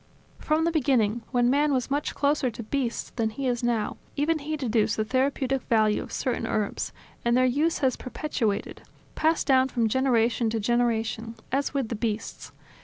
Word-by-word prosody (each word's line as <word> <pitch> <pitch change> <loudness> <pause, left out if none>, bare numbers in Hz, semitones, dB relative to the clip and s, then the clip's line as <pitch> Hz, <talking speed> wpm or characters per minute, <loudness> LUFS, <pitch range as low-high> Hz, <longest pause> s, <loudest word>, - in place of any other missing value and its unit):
From 310 +1 +1
the 335 - +2
beginning, 245 -7 +2
when 245 -1 +2
man 290 +2 +3
was 255 0 -1
much 290 +1 -1
closer 280 -2 +1
to 230 0 -7
beasts 245 +1 -2
than 225 -2 +1
than 215 - -13
he 275 - -3
is 245 -2 0
now, 235 -3 0 0.2
even 310 +3 +1
he 305 +2 -3
deduced 225 -6 +1
the 215 - 0
therapeutic 265 +2 0
value 215 -2 +3
of - - -9
certain 240 -3 -2
herbs: 210 -2 -2 0.3
and 235 +1 +3
their 255 - +4
use 295 +6 +1
has 255 - +1
perpetuated, 245 -6 -3 0.3
passed 320 +1 +1
down 260 -1 +4
from 235 -3 +1
generation 235 -1 +2
to 225 0 -1
generation, 225 0 0 0.2
as 280 +2 -1
with 265 -5 0
the 230 - -2
beasts. 220 0 -4
245 Hz, 180 wpm, -26 LUFS, 225-275 Hz, 0.3 s, their